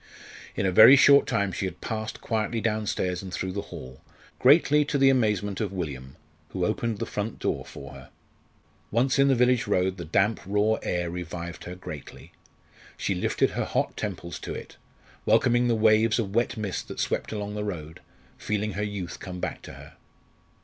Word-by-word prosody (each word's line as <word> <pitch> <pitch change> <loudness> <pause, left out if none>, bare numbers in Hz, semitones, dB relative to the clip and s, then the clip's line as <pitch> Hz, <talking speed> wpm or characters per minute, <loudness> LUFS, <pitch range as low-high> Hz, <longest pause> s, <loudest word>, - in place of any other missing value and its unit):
In 95 - -1
a 95 - +2
very 110 +8 +9
short 140 0 +6
time 100 -1 0
she 95 - -3
had 90 -2 -5
passed 110 0 -5
quietly 110 +1 -1
downstairs 105 -5 -1
and 95 -2 -8
through 95 +1 -3
the 100 +2 -3
hall, 65 +1 -10 0.4
greatly 150 +2 +5
to 145 - -1
the 135 -1 +5
amazement 105 -6 0
of 105 -3 -2
William, 70 -8 -5 0.3
who - - -2
opened 115 -3 -1
the - - -3
front 105 +2 -4
door - - -2
for 70 0 -10
her. 65 -1 -12 0.8
Once 130 +5 +1
in 140 - +5
the 135 - +4
village 125 -1 +2
road 95 -1 +1
the 85 - -5
damp 95 +7 +1
raw 105 +2 +1
air 90 -1 -2
revived 85 -1 -6
her 90 - -6
greatly. 80 -6 -10 0.7
She - - -1
lifted - - 0
her - - -2
hot - - -1
temples 85 0 -5
to - - -6
it, - - -9 0.5
welcoming 120 +2 +4
the 120 - +2
waves 110 0 +4
of 105 -5 -2
wet 120 +2 0
mist 105 -4 -4
that - - -8
swept - - -1
along 105 -1 -4
the 105 0 -3
road, 80 -6 -6 0.4
feeling 105 0 -2
her 100 +2 -4
youth 100 -4 -5
come 90 -1 -7
back - - -4
to - - -10
her. - - -13
105 Hz, 185 wpm, -26 LUFS, 90-115 Hz, 0.8 s, very